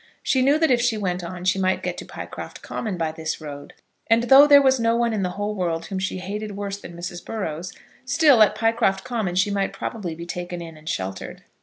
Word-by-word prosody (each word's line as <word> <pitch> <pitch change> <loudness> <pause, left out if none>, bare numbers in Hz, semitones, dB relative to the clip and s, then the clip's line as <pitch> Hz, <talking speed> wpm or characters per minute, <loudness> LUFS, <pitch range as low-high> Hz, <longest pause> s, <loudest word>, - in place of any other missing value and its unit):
She 260 - +2
knew 280 +3 +4
that 320 -3 +2
if 240 -1 +3
she 235 -2 +1
went 180 -3 -2
on 180 +1 -7
she 185 +1 +2
might 185 0 +1
get - - -2
to - - -7
Pycroft - - -8
Common 210 -5 -4
by 165 -2 -1
this 160 0 -4
road; 145 -2 -9 0.3
and 230 +1 +4
though 270 +4 +8
there 285 -1 +9
was 265 -2 +3
no 230 0 +2
one 235 -1 +1
in 210 - -1
the 180 - 0
whole 205 +1 -2
world 170 -4 -2
whom 190 - -4
she 190 0 -2
hated 205 +2 -5
worse 200 0 -4
than 170 - -10
Mrs. 175 0 -6
Burrows, 180 -5 -4 0.3
still 280 -2 +4
at 210 - +5
Pycroft 225 -4 +1
Common 225 -8 -2
she 195 +3 +2
might 200 -1 -1
probably 190 -8 -5
be 170 +1 -8
taken 175 0 -5
in 165 -1 -8
and 155 +1 -9
sheltered. 95 0 -5
195 Hz, 230 wpm, -23 LUFS, 175-230 Hz, 0.3 s, there